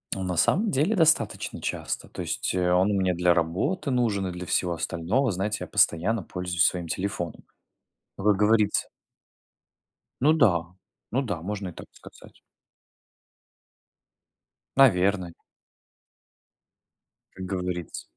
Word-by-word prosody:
Ну, 95 - -5
на 90 -2 -3
самом 205 - +3
деле, 155 +11 +1
достаточно 160 - +1
часто, - - -4
то - - -7
есть, - - -2
э, 90 -1 +1
он 95 +3 +3
у - - 0
меня 95 -2 +1
для 90 0 +3
работы 95 - -1
нужен 110 -7 0
и - - -3
для 90 0 -7
всего 90 0 0
остального. 90 +10 -1
Знаете, 100 +4 -2
я - - -5
постоянно 100 +6 +2
пользуюсь 90 -1 0
своим 90 -2 0
телефоном. 90 -1 -4 0.7
Вы 105 +1 +2
говорите 105 0 +2 1.4
Ну 150 +4 +5
да, 100 - +3 0.5
ну 130 - +1
да, 100 -11 -4
можно 100 0 -4
и - - -9
так - - -11
сказать. - - -16 2.4
Наверное. 95 -8 +3 2.0
Как 95 0 -7
говорится. 90 -2 -4
95 Hz, 125 wpm, -26 LUFS, 90-115 Hz, 2.4 s, Ну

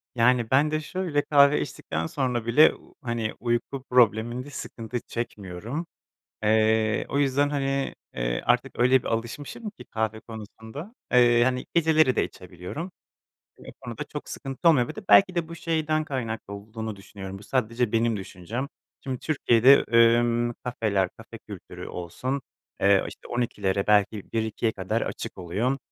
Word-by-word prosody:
Yani 120 -1 +3
ben 145 +3 +4
de 155 0 0
şöyle 170 -3 -1
kahve 140 0 +5
içtikten 80 +1 -4
sonra 125 - -1
bile, 120 +7 +7
ııı, - - -12
hani 115 -4 -2
uyku 120 +3 -2
probleminde 120 +1 +2
sıkıntı 120 -3 -5
çekmiyorum. 115 - -5 0.6
Iıı, 110 0 +3
o 140 - -1
yüzden 140 0 +2
hani, 135 -1 -1 0.2
ııı, - - -1
artık - - +1
öyle 125 +2 +5
bir - - -10
alışmışım 140 - -4
ki 205 - -14
kahve 110 0 -3
konusunda, 110 - -9 0.2
ııı, 120 -1 +6
hani 125 0 0
geceleri 155 -6 +4
de - - +3
içebiliyorum. 90 - -8 0.7
Bu - - -11
konuda - - -5
çok - - -8
sıkıntı 135 +5 -2
olmuyor, 125 -7 +4
bir - - -7
de 215 - -6
belki 185 -2 +7
de 170 -2 -1
bu 165 - -7
şeyden 155 -2 0
kaynaklı 115 -7 -4
olduğunu 110 +2 -6
düşünüyorum, 95 -1 -9
bu 100 - -13
sadece 115 -1 0
benim 115 -1 +2
düşüncem. 100 +7 -5 0.4
Şimdi 130 -2 -4
Türkiye'de 135 -3 +5 0.3
ımm 120 0 +1
kafeler, 105 -6 0
kafe 115 0 -11
kültürü 105 -4 -10
olsun, 130 +11 -4 0.4
ııı, 100 -1 +4
işte - - -11
12'lere 100 -5 -1
belki 105 -1 +2
1-2'ye 110 0 0
kadar 110 +3 -2
açık - - -5
oluyor. 105 +10 -1
120 Hz, 150 wpm, -26 LUFS, 110-135 Hz, 0.7 s, bile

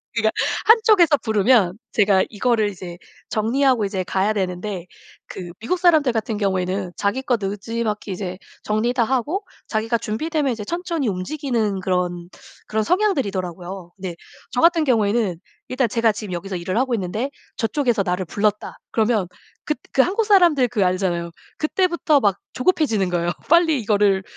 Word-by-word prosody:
그러니까 220 -1 +2 0.3
한쪽에서 430 -9 +5
부르면 215 -4 +2
제가 200 -3 +3
이거를 220 -1 +1
이제 175 -3 -8 0.3
정리하고 240 +1 +2
이제 195 -2 -2
가야 195 +3 0
되는데 185 -1 -3 0.4
그 175 -2 -8
미국 300 +12 -1
사람들 315 -7 +4
같은 225 -1 -2
경우에는 190 -2 -1
자기 205 +6 0
거 255 -2 +1
느지막이 210 +1 -3
이제 185 -1 -4 0.3
정리 215 +3 0
다 245 -2 +2
하고 270 - -1 0.2
자기가 225 +2 0
준비되면 285 +7 -1
이제 220 -3 -4
천천히 335 - -2
움직이는 215 +1 -1
그런 180 -2 -1 0.4
그런 220 0 0
성향들이더라고요. 195 - -1
근데 185 -3 -6 0.4
저 250 - 0
같은 335 -1 +5
경우에는 215 - +1 0.3
일단 255 -1 +1
제가 230 +1 +2
지금 210 -3 -6
여기서 190 +2 -4
일을 180 +3 -3
하고 255 0 +1
있는데 215 +6 -2 0.3
저쪽에서 240 -3 +1
나를 180 0 -1
불렀다, 210 +4 -1
그러면 220 -4 +1 0.4
긋 300 - -1 0.2
그 270 - +5
한국 400 - +1
사람들 350 - +5
그 225 -4 0
알잖아요. 180 -2 -1 0.3
그때부터 335 -2 +2
막 200 -6 +2 0.2
조급해지는 255 - +1
거예요. 175 -1 0 0.2
'빨리 325 -3 +4
이거를 205 -3 +2
215 Hz, 370 characters per minute, -21 LUFS, 190-265 Hz, 0.4 s, 한쪽에서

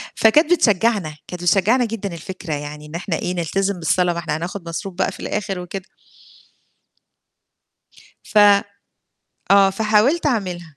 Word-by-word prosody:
فكانت 305 +10 +4
بتشجّعنا 205 - +1
كانت 180 -1 -7
بتشجّعنا 210 +8 +3
جدًا 210 -5 -5
الفكرة 170 -1 -6
يعني، 150 +1 -6
إن 150 +2 -10
إحنا 175 0 -3
إيه، 180 - -3
نلتزم 195 +3 -1
بالصلاة 175 +2 +1
مإحنا 165 -3 -3
حناخد 170 +3 -5
مصروف 190 +3 -5
بقى - - 0
في - - -12
الآخر 195 -3 -3
وكده. 185 +2 -7 2.4
ف - - -3 1.1
آه 195 -1 +6
فحاولت 220 - +2
أعملها. 180 - -3
190 Hz, 130 wpm, -20 LUFS, 170-210 Hz, 2.4 s, آه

